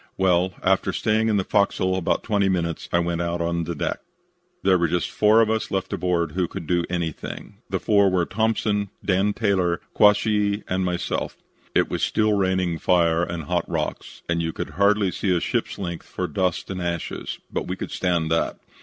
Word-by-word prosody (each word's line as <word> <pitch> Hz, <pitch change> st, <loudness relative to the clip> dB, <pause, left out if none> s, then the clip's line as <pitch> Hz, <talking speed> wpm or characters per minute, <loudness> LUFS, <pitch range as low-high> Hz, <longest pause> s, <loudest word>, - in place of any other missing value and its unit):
"Well, 90 Hz, -1 st, +2 dB
after 95 Hz, 0 st, +2 dB
staying 110 Hz, +1 st, +1 dB
in 105 Hz, -, +2 dB
the 95 Hz, -, +1 dB
fo'c's'l 95 Hz, -2 st, +1 dB
about 95 Hz, -3 st, 0 dB
twenty 100 Hz, -3 st, +1 dB
minutes 85 Hz, -3 st, -2 dB
I -, -, +3 dB
went 85 Hz, 0 st, 0 dB
out 85 Hz, 0 st, -2 dB
on 85 Hz, 0 st, -1 dB
deck. 80 Hz, -3 st, -3 dB, 0.6 s
There 95 Hz, -, +5 dB
were 85 Hz, -, +2 dB
just 90 Hz, +2 st, -1 dB
four 110 Hz, +2 st, +5 dB
of 110 Hz, -1 st, +2 dB
us 110 Hz, 0 st, -1 dB
left 95 Hz, -1 st, -2 dB
aboard 85 Hz, -3 st, 0 dB
who 90 Hz, +2 st, 0 dB
could 80 Hz, -, -7 dB
do 85 Hz, +1 st, +1 dB
anything. 85 Hz, -3 st, -4 dB
The -, -, -1 dB
four 100 Hz, -2 st, +4 dB
were 90 Hz, -2 st, +1 dB
Thompson, 105 Hz, -1 st, 0 dB, 0.2 s
Dan 100 Hz, +2 st, +2 dB
Taylor, 95 Hz, -6 st, +1 dB
Quashee, 105 Hz, 0 st, +3 dB
and 95 Hz, +1 st, 0 dB
myself. 90 Hz, -1 st, -2 dB, 0.4 s
It -, -, +4 dB
was -, -, -3 dB
still 110 Hz, -1 st, +2 dB
raining 95 Hz, -4 st, +1 dB
fire 85 Hz, -2 st, +3 dB
and 85 Hz, -1 st, -3 dB
hot -, -, -1 dB
rocks -, -, -4 dB
and 85 Hz, 0 st, 0 dB
you 80 Hz, 0 st, -1 dB
could -, -, -5 dB
hardly 100 Hz, 0 st, +3 dB
see 95 Hz, -1 st, 0 dB
a -, -, +1 dB
ship's -, -, -2 dB
length 85 Hz, -3 st, -5 dB
for 90 Hz, -, -3 dB
dust 90 Hz, +4 st, -1 dB
and 90 Hz, -1 st, -4 dB
ashes, 85 Hz, -2 st, -3 dB, 0.2 s
but -, -, -2 dB
we 90 Hz, -, -2 dB
could -, -, -6 dB
stand 85 Hz, -3 st, 0 dB
that. 80 Hz, -, +1 dB
90 Hz, 190 wpm, -24 LUFS, 85-100 Hz, 0.6 s, There